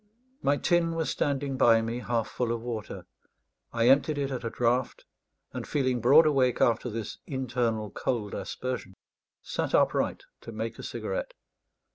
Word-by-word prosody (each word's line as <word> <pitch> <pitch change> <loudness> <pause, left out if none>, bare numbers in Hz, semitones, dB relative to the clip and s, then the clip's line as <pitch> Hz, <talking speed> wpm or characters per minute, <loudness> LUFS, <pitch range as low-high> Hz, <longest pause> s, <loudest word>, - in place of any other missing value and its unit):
My 145 +1 +2
tin 170 0 +1
was 160 -4 -1
standing 140 -1 -1
by 115 -2 +5
me 115 +2 -3
half 120 -2 -1
full 120 -2 -2
of 115 -1 -2
water. 115 -4 -5 0.7
I 115 0 +2
emptied 145 +3 +4
it 140 -1 -1
at 130 - -4
a 115 - -2
draught; 120 +2 0 0.5
and - - -5
feeling 130 -4 0
broad 145 +7 +7
awake 135 -5 +2
after 120 +1 +2
this 110 -1 -5
internal 120 -5 -1
cold 110 -5 -2
aspersion, 125 -7 -5 0.5
sat - - -1
upright - - +1 0.2
to 115 - -9
make 110 +1 -5
a - - -7
cigarette. - - -4
125 Hz, 155 wpm, -28 LUFS, 115-140 Hz, 0.7 s, broad